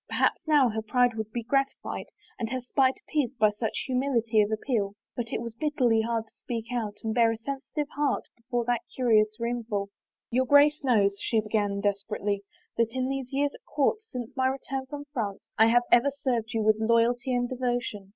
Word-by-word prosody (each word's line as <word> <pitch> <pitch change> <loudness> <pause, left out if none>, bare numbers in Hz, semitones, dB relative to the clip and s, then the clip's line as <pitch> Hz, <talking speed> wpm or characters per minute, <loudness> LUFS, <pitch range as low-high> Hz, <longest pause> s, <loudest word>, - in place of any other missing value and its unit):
Perhaps - - +1
now 295 -4 +5
her 220 0 -2
pride 245 +2 +2
would 220 -1 -5
be 235 0 -3
gratified 275 +3 -1 0.3
and 225 -2 -2
her 255 +1 -2
spite 260 +1 +2
appeased 275 -4 -1
by 215 -1 +4
such 215 +1 -3
humility 250 -4 +2
of 210 +1 0
ap 220 - -1
peal. 205 -6 0 0.2
But 235 -2 -4
it - - -2
was 230 -1 -6
bitterly 245 -4 +2
hard 225 0 -1
to - - -28
speak 235 0 -5
out 220 -4 -2
and 220 -1 -1
bare 230 -1 +4
a 225 - -3
sensitive 275 +4 -4
heart 290 -1 +1
before 240 0 -3
that 240 -1 +1
curious 215 -4 +3
roomful.. 230 -4 -2 0.2
" - - -66
Your 255 +2 +2
Grace 290 +2 +5
knows," 205 -6 +3
she 225 - +1
began 205 -2 -1
desperately, 205 0 -1 0.2
" - - -40
that 230 0 +1
in 260 0 0
these 270 -1 -3
years 280 +1 0
at - - -14
court, 295 +9 +1
since 250 - -7
my 260 -1 +2
return 265 0 -3
from 290 +1 -7
France, 210 -7 -3 0.2
I 220 - +7
have 240 +1 +4
ever 245 +4 +6
served 245 -5 -2
you 220 - +1
with 215 0 +4
loyalty 235 +3 +2
and 245 0 +1
devotion. 245 -6 -2
235 Hz, 205 wpm, -27 LUFS, 220-260 Hz, 0.3 s, I